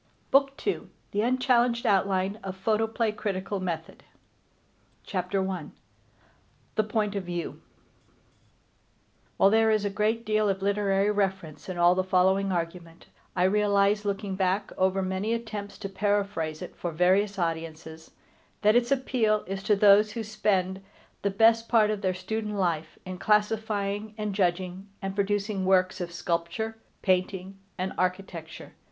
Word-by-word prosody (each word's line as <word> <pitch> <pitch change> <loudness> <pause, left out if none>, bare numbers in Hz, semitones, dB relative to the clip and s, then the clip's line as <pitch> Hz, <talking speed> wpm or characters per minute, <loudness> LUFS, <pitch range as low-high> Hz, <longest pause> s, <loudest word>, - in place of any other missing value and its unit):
BOOK 275 0 +3
II 405 - -1 0.2
THE 205 - 0
UNCHALLENGED 245 -1 +2
OUTLINE 195 +1 +1
OF 190 -1 -5
PHOTOPLAY 220 +3 0
CRITICAL 200 -2 -3
METHOD 170 -3 -5 1.0
CHAPTER 190 0 -1
I 185 -5 -4 1.1
THE 215 - +2
POINT 210 -1 -1
OF 200 - -2
VIEW 175 -1 -5 1.8
While 195 - +5
there 225 0 +4
is 215 -1 +2
a 200 - -1
great 220 +3 0
deal 215 -1 +2
of 195 0 -1
literary 200 0 +2
reference 190 -6 -2
in 185 - -4
all 175 0 +5
the 185 +1 +1
following 190 +1 +2
argument, 170 -1 -5 0.3
I 180 - +2
realize, 200 +1 +3
looking 200 -1 -2
back 190 +1 0
over 190 +1 +1
many 190 +4 -1
attempts 215 -3 -6
to 200 - -5
paraphrase 200 -6 -1
it - - -9
for 175 - -4
various 190 +5 +2
audiences, 160 -2 -4 0.5
that 210 +2 +5
its 240 +1 +2
appeal 240 -5 +1
is 195 +1 -4
to 210 +1 +3
those 205 +1 +5
who 230 - -3
spend 195 -3 0 0.4
the 200 - +1
best 225 +3 +4
part 220 -3 +4
of 210 -2 -3
their 185 -2 0
student 210 +3 -3
life 170 -5 -1
in 185 -1 -6
classifying, 210 -1 0
and 210 -2 -2
judging, 185 0 -1
and 195 -1 -4
producing 200 0 -1
works 185 0 +2
of 175 -1 -4
sculpture, 170 +7 -3 0.2
painting, 190 +1 0 0.2
and 185 +1 -2
architecture. 180 -3 -3
195 Hz, 145 wpm, -27 LUFS, 185-215 Hz, 1.8 s, While